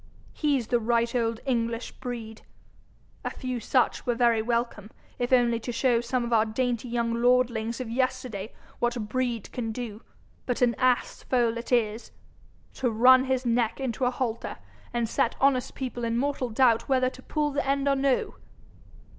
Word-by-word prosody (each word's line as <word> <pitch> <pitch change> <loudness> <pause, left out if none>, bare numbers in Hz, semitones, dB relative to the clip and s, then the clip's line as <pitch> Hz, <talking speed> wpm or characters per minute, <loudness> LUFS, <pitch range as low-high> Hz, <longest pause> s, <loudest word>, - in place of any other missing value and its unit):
He's 285 -6 +1
the 240 - +3
right 235 +1 +1
old 230 -2 0
English 230 -2 -1
breed. 230 -4 -7 0.8
A - - -1
few 255 -1 -4
such 250 +3 +1
were 240 - 0
very 235 -2 +3
welcome, 235 -2 -2 0.3
if 245 +1 -1
only 240 -2 +4
to 245 - -5
show 235 0 +2
some 245 +1 -1
of 235 - -2
our 220 -1 +5
dainty 240 +2 -2
young 235 -1 0
lordlings 240 -2 +2
of 255 - -4
yesterday 250 -4 -2 0.3
what 240 0 0
breed 240 -1 -2
can 230 -3 -3
do. 220 -2 -6 0.5
But 250 0 0
an 240 -1 +4
ass 255 -1 +1
foal 240 -3 +1
it 235 - -9
is! 225 -2 +1 0.7
To 250 - +2
run 255 +4 +6
his 260 -1 0
neck 235 0 +1
into 255 -1 -1
a - - +4
halter, 245 -3 -3 0.3
and 235 -1 0
set 230 - 0
honest 265 -2 +2
people 245 -2 -4
in 230 0 0
mortal 270 -1 -1
doubt 230 +1 +3
whether 255 -1 +2
to 260 - -13
pull 295 +2 -1
the 285 +1 -1
end 275 +1 0
or 280 - +4
no! 270 -1 +1
240 Hz, 170 wpm, -27 LUFS, 230-255 Hz, 0.8 s, run